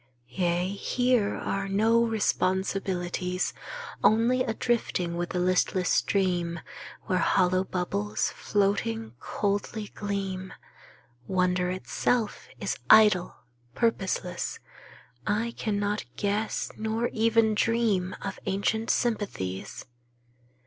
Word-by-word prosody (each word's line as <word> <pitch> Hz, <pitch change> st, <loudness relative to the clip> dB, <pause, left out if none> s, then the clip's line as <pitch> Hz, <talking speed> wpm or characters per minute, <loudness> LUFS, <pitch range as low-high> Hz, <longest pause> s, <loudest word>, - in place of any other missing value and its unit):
Yea, 175 Hz, +5 st, 0 dB
here 240 Hz, +2 st, +1 dB
are 195 Hz, 0 st, -2 dB
no 225 Hz, +4 st, +4 dB
responsibilities. 185 Hz, -4 st, 0 dB, 0.5 s
Only 235 Hz, +4 st, +4 dB
a 225 Hz, -3 st, -1 dB
drifting 185 Hz, -9 st, 0 dB
with 175 Hz, 0 st, -2 dB
the -, -, -3 dB
listless 185 Hz, 0 st, +2 dB
stream 175 Hz, -4 st, +1 dB, 0.4 s
Where 185 Hz, -1 st, 0 dB
hollow 185 Hz, +1 st, +3 dB
bubbles, 110 Hz, -, -1 dB
floating, 120 Hz, -, 0 dB
coldly 205 Hz, +1 st, -2 dB
gleam. 195 Hz, -2 st, -3 dB, 0.7 s
Wonder 180 Hz, -1 st, +1 dB
itself 210 Hz, +4 st, -1 dB
is -, -, -2 dB
idle, 210 Hz, -5 st, +6 dB, 0.4 s
purposeless; 190 Hz, -6 st, -1 dB, 0.7 s
I 225 Hz, +3 st, 0 dB
cannot 205 Hz, -1 st, -1 dB
guess 205 Hz, +1 st, -1 dB
Nor 220 Hz, +2 st, -1 dB
even 225 Hz, 0 st, +3 dB
dream 215 Hz, -5 st, +1 dB
of 195 Hz, -, -4 dB
ancient 200 Hz, +3 st, 0 dB
sympathies. 200 Hz, -, -2 dB
195 Hz, 95 wpm, -27 LUFS, 180-220 Hz, 0.7 s, idle